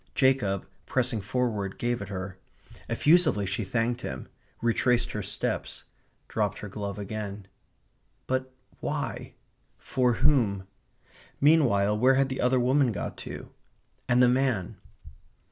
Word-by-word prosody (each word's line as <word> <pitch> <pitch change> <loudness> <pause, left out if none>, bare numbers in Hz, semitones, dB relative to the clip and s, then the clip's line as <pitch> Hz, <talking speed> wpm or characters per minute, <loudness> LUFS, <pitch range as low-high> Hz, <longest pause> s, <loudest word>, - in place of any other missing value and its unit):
Jacob, 130 -8 +2 0.2
pressing 120 -4 0
forward, 105 -2 -1
gave 120 -1 -1
it 100 - -6
her. 95 -1 -5 0.5
Effusively 155 - +4
she 105 +4 -1
thanked 115 +4 -1
him; 65 -9 -5 0.3
retraced 120 +1 +2
her 105 - -3
steps; 100 +1 -3 0.4
dropped - - -1
her 105 - -7
glove 100 0 -5
again. 105 -1 -5 0.8
But 130 0 -1 0.3
why? - - -4 0.4
For 125 -2 +1
whom? 115 -8 +2 0.7
Meanwhile, 115 -10 +4
where 130 +3 +5
had 135 0 +2
the 130 - -3
other 125 +1 +3
woman 130 +1 +3
got - - -4
to? - - -8 0.6
And 125 +1 +5
the - - +7
man? 125 -7 +1
120 Hz, 125 wpm, -28 LUFS, 100-130 Hz, 0.8 s, the